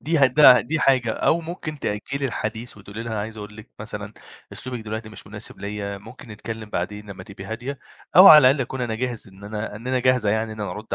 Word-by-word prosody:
دي 165 Hz, 0 st, 0 dB
هتبق 135 Hz, -1 st, +7 dB
دي 155 Hz, +4 st, -2 dB
حاجة، 130 Hz, -4 st, +3 dB
أو 170 Hz, -, +1 dB
ممكن 165 Hz, -2 st, -7 dB
تأجّلي 135 Hz, +6 st, -3 dB
الحديث 110 Hz, -1 st, -5 dB
وتقولي 105 Hz, +2 st, -8 dB
لها: 115 Hz, -1 st, -5 dB
"أنا 105 Hz, -, -2 dB
عايزة 110 Hz, +1 st, -6 dB
أقول 105 Hz, 0 st, -9 dB
لِك 105 Hz, +3 st, -13 dB
مثلًا 105 Hz, -1 st, -7 dB, 0.4 s
أسلوبِك 125 Hz, -2 st, -6 dB
دلوقتي 110 Hz, 0 st, -6 dB
مش 105 Hz, -2 st, -11 dB
مناسب 105 Hz, 0 st, -7 dB
ليَّ، 100 Hz, -1 st, -5 dB
ممكن 110 Hz, +5 st, -13 dB
نتكلّم 110 Hz, 0 st, -7 dB
بعدين 105 Hz, +4 st, -4 dB
لمّا 95 Hz, -, -9 dB
تبقي 100 Hz, -2 st, -10 dB
هادية، 120 Hz, +5 st, -6 dB, 0.4 s
أو 185 Hz, +2 st, +11 dB
على 155 Hz, -, +11 dB
الأقل 140 Hz, +1 st, 0 dB
أكون 130 Hz, +1 st, -4 dB
أنا 120 Hz, -2 st, -2 dB
جاهز 120 Hz, -2 st, -3 dB
إن 95 Hz, +1 st, -15 dB
أنا 105 Hz, 0 st, -5 dB
إن 115 Hz, +4 st, -11 dB
أنا 130 Hz, 0 st, +1 dB
جاهزة 125 Hz, -4 st, +2 dB
يعني 110 Hz, +1 st, -1 dB
إن 110 Hz, -, -9 dB
أنا 105 Hz, -3 st, -3 dB
أرُد 105 Hz, +4 st, -5 dB
110 Hz, 225 wpm, -23 LUFS, 105-130 Hz, 0.4 s, أو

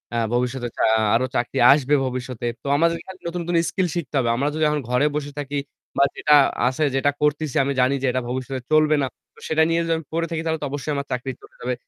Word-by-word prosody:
আ -, -, +1 dB, 0.2 s
ভবিষ্যতে 125 Hz, 0 st, -1 dB, 0.2 s
আ -, -, +5 dB, 0.3 s
আরো 130 Hz, +2 st, +2 dB
চাকরি 120 Hz, -, -1 dB
আসবে 145 Hz, 0 st, +3 dB
ভবিষ্যতে। 125 Hz, -2 st, -4 dB, 0.2 s
তো -, -, -6 dB
আমাদের 170 Hz, +1 st, +3 dB
এখানে 190 Hz, 0 st, -11 dB
নতুন 175 Hz, +1 st, -3 dB
কোন 175 Hz, -, 0 dB
স্কিল 185 Hz, -2 st, 0 dB
শিখতে 150 Hz, -4 st, -4 dB
হবে। 120 Hz, -2 st, +1 dB
আমরা 140 Hz, +4 st, 0 dB
যদি 155 Hz, 0 st, -1 dB
এখন 150 Hz, 0 st, 0 dB
ঘরে 125 Hz, +4 st, +2 dB
বসে 145 Hz, -1 st, -3 dB
থাকি 145 Hz, 0 st, -4 dB, 0.4 s
বা 140 Hz, -, +5 dB
যেটা 150 Hz, -, +2 dB, 0.3 s
আছে 130 Hz, +4 st, 0 dB
যেটা 145 Hz, +2 st, +2 dB
করতেছি 150 Hz, 0 st, 0 dB
আমি 140 Hz, +1 st, -1 dB
জানি 130 Hz, +2 st, +3 dB
যে -, -, +2 dB
এটা 130 Hz, -, -1 dB
ভবিষ্যতে 130 Hz, 0 st, -4 dB
চলবে 155 Hz, 0 st, +4 dB
না। 135 Hz, -, 0 dB, 0.3 s
তো -, -, -18 dB
সেটা 160 Hz, 0 st, +3 dB
নিয়ে 165 Hz, 0 st, +2 dB
যদি 165 Hz, 0 st, 0 dB
আমি 160 Hz, -, -8 dB
পড়ে 165 Hz, 0 st, 0 dB
থাকি 165 Hz, -1 st, -2 dB
তাহলে 160 Hz, -1 st, -1 dB
তো -, -, -2 dB
অবশ্যই 145 Hz, +1 st, -3 dB
আমার 140 Hz, 0 st, -3 dB
চাকরি 125 Hz, +1 st, -2 dB
চলে -, -, -17 dB
যাবে। 125 Hz, +1 st, -1 dB
145 Hz, 235 wpm, -22 LUFS, 130-155 Hz, 0.4 s, আ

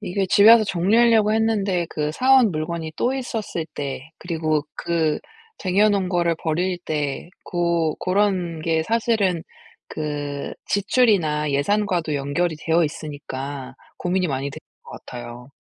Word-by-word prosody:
이게 195 Hz, -1 st, -1 dB
집에 205 Hz, +2 st, +7 dB
와서 230 Hz, -1 st, +7 dB
정리하려고 215 Hz, +4 st, +3 dB
했는데 205 Hz, -5 st, +1 dB
그 150 Hz, -1 st, -2 dB
사 260 Hz, +10 st, +3 dB
온 245 Hz, -5 st, +5 dB
물건이 160 Hz, 0 st, -4 dB
또 255 Hz, +2 st, +1 dB
있었을 225 Hz, -10 st, -4 dB
때 140 Hz, +1 st, -5 dB
그리고 160 Hz, -3 st, -1 dB
그 160 Hz, -3 st, 0 dB, 0.4 s
쟁여 195 Hz, +3 st, +3 dB
놓은 200 Hz, -3 st, +1 dB
거를 170 Hz, -2 st, +2 dB
버릴 175 Hz, +3 st, 0 dB
때 150 Hz, +1 st, -3 dB
고 170 Hz, -3 st, 0 dB
고런 185 Hz, -4 st, 0 dB
게 160 Hz, 0 st, +1 dB
사실은 215 Hz, -4 st, +1 dB, 0.5 s
그 145 Hz, -2 st, -4 dB
지출이나 195 Hz, -, +2 dB
예산과도 175 Hz, +2 st, 0 dB
연결이 145 Hz, +4 st, -1 dB
되어 165 Hz, +1 st, +2 dB
있으니까 140 Hz, -3 st, -6 dB, 0.2 s
고민이 180 Hz, +1 st, 0 dB
많이 140 Hz, -2 st, -2 dB
되는 -, -, -9 dB, 0.2 s
것 -, -, -14 dB, 0.2 s
같아요. 120 Hz, +1 st, -9 dB
170 Hz, 285 characters per minute, -22 LUFS, 150-200 Hz, 0.5 s, 집에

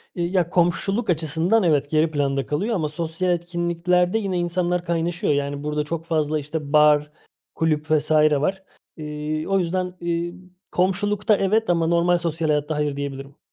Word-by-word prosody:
İii, 175 Hz, 0 st, -2 dB
ya 170 Hz, -1 st, +2 dB
komşuluk 190 Hz, +6 st, +1 dB
açısından 165 Hz, +6 st, +1 dB
evet, 145 Hz, -4 st, +2 dB
geri 155 Hz, +1 st, +2 dB
planda 140 Hz, -2 st, 0 dB
kalıyor 205 Hz, +11 st, -1 dB
ama 155 Hz, -5 st, -1 dB
sosyal 165 Hz, +3 st, -2 dB
etkinliklerde 175 Hz, +2 st, 0 dB
yine 195 Hz, -4 st, -2 dB
insanlar 175 Hz, 0 st, -1 dB
kaynaşıyor 170 Hz, +1 st, 0 dB
yani 140 Hz, 0 st, -2 dB
burada 150 Hz, 0 st, -1 dB
çok 165 Hz, +2 st, -5 dB
fazla, 155 Hz, -2 st, 0 dB
işte, 150 Hz, 0 st, -5 dB
bar, 150 Hz, 0 st, +5 dB, 0.4 s
kulüp 155 Hz, -1 st, 0 dB
vs. 155 Hz, 0 st, +1 dB
var. 155 Hz, +5 st, +2 dB, 0.3 s
Eee, 150 Hz, 0 st, -4 dB
o 195 Hz, 0 st, +2 dB
yüzden, 180 Hz, +1 st, -1 dB
iii, 170 Hz, 0 st, -2 dB, 0.4 s
komşulukta 205 Hz, +4 st, +1 dB
evet 215 Hz, +2 st, +1 dB
ama 170 Hz, -2 st, +2 dB
normal 170 Hz, +1 st, +3 dB
sosyal 165 Hz, -1 st, -2 dB
hayatta 150 Hz, +1 st, 0 dB
hayır, 150 Hz, -1 st, -1 dB
diyebilirim. 140 Hz, 0 st, -6 dB
165 Hz, 155 wpm, -23 LUFS, 150-180 Hz, 0.4 s, bar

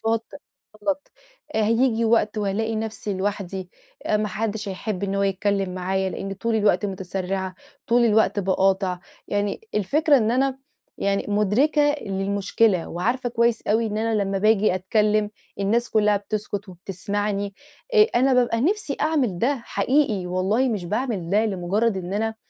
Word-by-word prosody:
تصرفات 225 Hz, 0 st, 0 dB, 0.6 s
غلط 290 Hz, +4 st, -2 dB, 0.4 s
هييجي 230 Hz, +2 st, +2 dB
وقت 220 Hz, -1 st, +2 dB
وهالاقي 215 Hz, +2 st, -1 dB
نفسي 215 Hz, -2 st, -3 dB
لوحدي 190 Hz, -1 st, -3 dB, 0.4 s
ما 210 Hz, 0 st, +1 dB
حدش 215 Hz, +1 st, -3 dB
هيحب 195 Hz, 0 st, -4 dB
إن 195 Hz, -1 st, -1 dB
هو 200 Hz, -, +1 dB
يتكلم 195 Hz, -1 st, 0 dB
معايا 190 Hz, +1 st, -1 dB
لإني 195 Hz, +1 st, -5 dB
طُول 230 Hz, +4 st, -2 dB
الوقت 205 Hz, -3 st, +2 dB
متسرعة، 190 Hz, 0 st, -3 dB, 0.3 s
طُول 240 Hz, +1 st, +4 dB
الوقت 220 Hz, -2 st, +3 dB
باقاطع، 190 Hz, -1 st, +1 dB, 0.3 s
يعني 205 Hz, 0 st, -1 dB
الفكرة 285 Hz, -, +3 dB
إن 225 Hz, -4 st, +2 dB
أنا 265 Hz, +2 st, +1 dB, 0.4 s
يعني 200 Hz, 0 st, 0 dB
مدركة 270 Hz, +9 st, +3 dB
للمشكلة 195 Hz, 0 st, +1 dB
وعارفة 240 Hz, +9 st, -1 dB
كويس 235 Hz, -1 st, +1 dB
أوي 225 Hz, +2 st, +2 dB
إن 210 Hz, 0 st, -2 dB
أنا 220 Hz, -1 st, +1 dB
لمّا 195 Hz, 0 st, -1 dB
باجي 215 Hz, -1 st, +3 dB
أتكلم 210 Hz, +2 st, +1 dB, 0.3 s
الناس 230 Hz, +5 st, +1 dB
كلها 210 Hz, -1 st, +3 dB
بتسُكت 205 Hz, 0 st, -4 dB
وبتسمعني، 200 Hz, +2 st, -3 dB, 0.4 s
آآ 430 Hz, -, +8 dB
أنا 260 Hz, +2 st, +4 dB
بابقى 240 Hz, -2 st, +2 dB
نِفسي 340 Hz, -, 0 dB
أعمل 275 Hz, -, +1 dB
ده 265 Hz, +5 st, +1 dB
حقيقي 250 Hz, -9 st, +1 dB
والله 190 Hz, +8 st, +1 dB
مش 210 Hz, -7 st, -2 dB
باعمل 210 Hz, -3 st, -2 dB
ده 210 Hz, +3 st, +3 dB
لمجرد 200 Hz, +3 st, 0 dB
إن 185 Hz, 0 st, -5 dB
أنا 220 Hz, +2 st, -1 dB
210 Hz, 145 wpm, -23 LUFS, 195-230 Hz, 0.6 s, آآ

